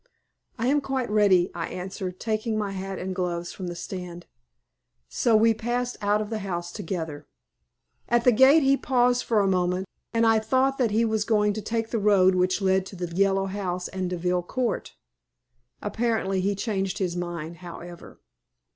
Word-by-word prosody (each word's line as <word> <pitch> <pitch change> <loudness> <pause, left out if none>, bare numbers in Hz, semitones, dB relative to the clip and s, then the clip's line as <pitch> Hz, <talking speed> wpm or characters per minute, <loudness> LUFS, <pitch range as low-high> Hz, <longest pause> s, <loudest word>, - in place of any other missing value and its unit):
"I 235 - -2
am 285 +3 +3
quite 265 -5 -2
ready," 200 -4 +4
I 165 -1 -3
answered, 185 0 -6
taking 220 0 -1
my 205 -2 -2
hat 195 0 -5
and 190 +1 -4
gloves 175 -2 -3
from 185 - -6
the 175 - -5
stand. 175 0 -7 0.8
So 230 - +2
we 225 +1 +5
passed 240 +2 -2
out 205 +1 +2
of 210 +1 -5
the 220 - -2
house 175 -3 -4
together. 160 -6 -5 0.8
At 240 0 +3
the 250 - +6
gate 265 +6 +6
he 270 0 +5
paused 250 -2 +2
for 220 -3 +2
a 195 - +2
moment, 180 0 +1 0.3
and 230 0 +2
I 225 -1 +5
thought 260 +5 +1
that 245 -3 +3
he 220 +2 +2
was 220 -1 0
going 210 -2 +2
to 215 - -4
take 225 +2 -2
the 230 - 0
road 195 -3 +4
which 185 +2 +1
led 190 0 +3
to 195 - -10
the 175 -2 -5
Yellow 195 0 +2
House 185 -2 -3
and 185 -1 -3
Deville 180 0 0
Court. 240 +7 -3 0.9
Apparently 205 -3 0
he 200 +2 0
changed 195 -2 -2
his 180 -4 -1
mind, 170 -2 -5
however. 175 0 -10
195 Hz, 180 wpm, -26 LUFS, 180-225 Hz, 0.9 s, the